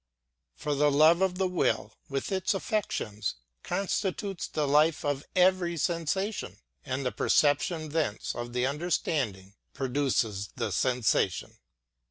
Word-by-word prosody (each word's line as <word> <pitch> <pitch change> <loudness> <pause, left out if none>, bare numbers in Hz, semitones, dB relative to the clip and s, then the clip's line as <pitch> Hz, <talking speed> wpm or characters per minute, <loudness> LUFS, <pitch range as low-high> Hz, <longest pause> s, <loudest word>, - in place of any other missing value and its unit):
For 150 - -2
the 145 +1 +3
love 155 +5 +5
of 190 -1 +1
the 190 0 +1
will, 180 -1 0 0.2
with 135 +7 -3
its 190 +1 +1
affections, 185 - -2 0.3
consti 195 -1 -1
tutes 195 -4 -5
the 150 -2 0
life 150 +1 +3
of 145 -1 -1
every 180 -2 +3
sensation; 175 +6 -1 0.3
and 130 +1 -3
the 125 - +1
perception 155 +2 +2
thence 145 -9 -1
of 120 0 -5
the 125 0 +1
understanding 135 - -1 0.2
produces 125 -7 0
the - - -2
sensation. 125 -3 0
150 Hz, 130 wpm, -29 LUFS, 130-180 Hz, 0.3 s, love